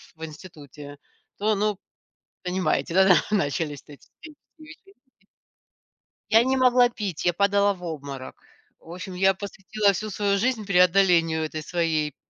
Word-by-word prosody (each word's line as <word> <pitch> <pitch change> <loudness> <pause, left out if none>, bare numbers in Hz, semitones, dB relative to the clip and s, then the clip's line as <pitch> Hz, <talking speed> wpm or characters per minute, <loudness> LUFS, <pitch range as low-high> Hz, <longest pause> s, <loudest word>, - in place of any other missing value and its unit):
в 160 - -7
институте, 150 -3 -12 0.4
то 215 +1 +1
ну, 210 -1 -1 0.7
понимаете, 180 -4 -1
да, 190 -1 +6 0.2
начались 145 -6 -1
вот 145 - -12
эти - - -25
все 310 -1 -11 0.3
вечеринки. 325 +6 -16 1.3
Я 225 +2 +6
не 265 +1 0
могла 250 -1 +4
пить, 205 -9 -5
я 175 - +3
падала 200 +2 +2
в 180 -2 -15
обморок. 140 -5 -7 0.4
В 165 - -14
общем 185 +1 -8
я 190 +1 +3
посвятила 200 +1 -1
всю 215 +3 -4
свою 200 0 0
жизнь 225 -1 -1
преодолению 180 -3 +3
этой 155 0 -6
своей 155 -3 -1
185 Hz, 140 wpm, -24 LUFS, 160-210 Hz, 1.3 s, да